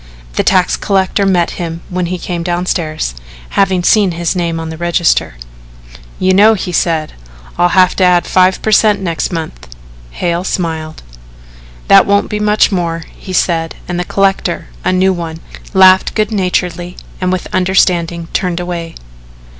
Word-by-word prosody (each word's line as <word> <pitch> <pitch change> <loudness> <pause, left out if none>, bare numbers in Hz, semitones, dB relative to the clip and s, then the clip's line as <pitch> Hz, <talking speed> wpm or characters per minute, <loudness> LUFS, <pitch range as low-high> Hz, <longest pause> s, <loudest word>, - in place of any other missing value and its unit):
The - - +1
tax 185 -2 +2
collector 195 0 0
met 175 -3 +1
him 165 -1 -5
when 180 -1 -2
he 180 +1 -3
came 175 -1 -4
downstairs 170 - -2 0.4
having 190 -2 +1
seen 200 -2 +3
his 170 +1 -2
name 170 -2 -2
on 160 0 -5
the 160 - -7
register. 170 - 0 0.8
"You 185 0 +2
know," 215 +3 +5
he 180 -2 -4
said, 165 -2 0 0.4
"I'll 175 - +2
have 185 -1 +4
to 190 - +2
add 180 -1 +3
5 185 0 +2
per 220 - 0
cent. 210 -1 +4
next 170 -2 -2
month." 160 - -6 0.4
Hale 170 - -2
smiled. 160 -4 -4 0.8
"That - - +6
won't 200 0 +1
be 210 - -2
much 210 0 +2
more," 170 -3 -2
he 190 - -10
said, 165 -3 0
and 175 -1 -3
the - - 0
collector, 195 -2 -1
a - - +1
new 190 +1 +2
one, 165 -2 -5 0.3
laughed 190 -1 +5
good 215 0 0
naturedly 180 -3 -2 0.2
and 185 0 0
with 185 -1 -2
understanding 175 -2 +1
turned 180 -2 -1
away. 175 -2 -5
180 Hz, 160 wpm, -14 LUFS, 170-190 Hz, 0.8 s, That